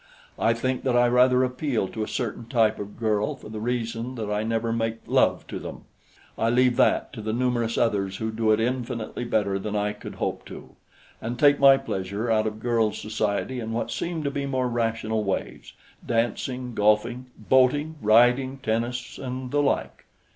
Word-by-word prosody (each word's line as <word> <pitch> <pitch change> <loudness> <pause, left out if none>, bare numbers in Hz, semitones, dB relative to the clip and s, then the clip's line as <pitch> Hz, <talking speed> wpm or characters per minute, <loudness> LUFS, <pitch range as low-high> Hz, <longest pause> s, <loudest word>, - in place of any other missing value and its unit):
I 115 +1 +3
think 130 +2 -1
that 125 -2 0
I 120 0 +5
rather 125 +1 +4
appeal 125 -4 -1
to 110 - -5
a 110 - -2
certain 120 -1 -4
type 115 -3 +2
of 105 0 -7
girl 110 -2 0
for - - -12
the 110 0 -6
reason 115 +1 -3
that 110 -3 -4
I 105 0 0
never 115 +1 -1
make 115 -1 -1
love - - +2
to - - -5
them; - - -8 0.6
I 115 - +2
leave 125 +1 +3
that - - +2
to 115 - -7
the 110 +1 -2
numerous 120 -2 0
others 100 -4 0
who 110 0 -3
do 110 0 +1
it 110 - +3
infinitely 120 -1 -2
better 100 -4 0
than 105 +1 -4
I 105 0 0
could 105 - -9
hope - - -3
to, - - -10 0.5
and 120 +2 -4
take 145 0 +5
my 135 -1 +8
pleasure 100 +2 -3
out 110 0 +2
of 110 0 -5
girls' 115 -2 +1
society 110 +3 -2
in 115 -1 -4
what 115 - -2
seem 170 -2 -3
to 140 - -1
be 140 0 -3
more 130 -2 0
rational 115 -2 -1
ways 100 -2 -4 0.3
dancing, 120 +2 -2
golfing, 110 +4 +1
boating, 130 +7 +2
riding, 125 +5 +4
tennis, 120 0 -3
and 130 -1 -5
the 145 - +2
like. 140 - -1
115 Hz, 185 wpm, -25 LUFS, 110-125 Hz, 0.6 s, my